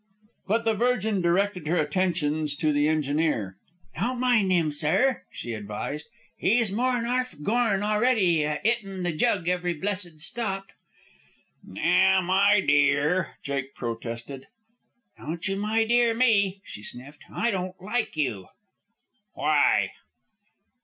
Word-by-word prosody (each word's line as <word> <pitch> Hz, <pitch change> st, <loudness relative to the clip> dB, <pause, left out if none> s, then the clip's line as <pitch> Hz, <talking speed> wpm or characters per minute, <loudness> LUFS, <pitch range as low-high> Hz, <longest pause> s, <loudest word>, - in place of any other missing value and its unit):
But 225 Hz, +3 st, 0 dB
the 225 Hz, -, +3 dB
Virgin 220 Hz, -3 st, 0 dB
directed 180 Hz, -1 st, 0 dB
her 175 Hz, +3 st, +1 dB
attentions 155 Hz, -2 st, 0 dB
to 150 Hz, +1 st, 0 dB
the 145 Hz, +1 st, +2 dB
engineer. 150 Hz, -, -1 dB, 0.4 s
"Don't 245 Hz, +5 st, -2 dB
mind 240 Hz, -7 st, +2 dB
'im, 165 Hz, -4 st, +2 dB
sir," 180 Hz, -, +1 dB
she 120 Hz, -, -6 dB
advised. 105 Hz, +8 st, -5 dB, 0.3 s
"'E's 225 Hz, -1 st, +2 dB
more'n 245 Hz, +2 st, 0 dB
arf 255 Hz, +1 st, -1 dB
gorn 215 Hz, 0 st, +1 dB
a'ready, 210 Hz, -6 st, +2 dB
a 150 Hz, 0 st, -1 dB
'itting 195 Hz, -5 st, -2 dB
the 175 Hz, -, 0 dB
jug 180 Hz, +1 st, 0 dB
every 180 Hz, -1 st, 0 dB
blessed 185 Hz, -2 st, 0 dB
stop." 195 Hz, +1 st, 0 dB, 0.9 s
"Now, 190 Hz, 0 st, +2 dB
my 195 Hz, +3 st, +4 dB
dear 145 Hz, +4 st, +2 dB
" -, -, -43 dB
Jake 140 Hz, -1 st, -4 dB
protested. 115 Hz, +3 st, -6 dB, 0.7 s
"Don't 165 Hz, +4 st, -5 dB
you 195 Hz, -, -1 dB
my 215 Hz, +3 st, +1 dB
dear 235 Hz, 0 st, +3 dB
me," 200 Hz, -5 st, +2 dB
she 105 Hz, -, -9 dB
sniffed. 130 Hz, +7 st, -10 dB
"I 235 Hz, -, 0 dB
don't 185 Hz, -1 st, -4 dB
like 210 Hz, -1 st, -2 dB
you." 115 Hz, -11 st, -2 dB, 0.9 s
"Why?" -, -, +2 dB
185 Hz, 130 wpm, -26 LUFS, 150-215 Hz, 0.9 s, my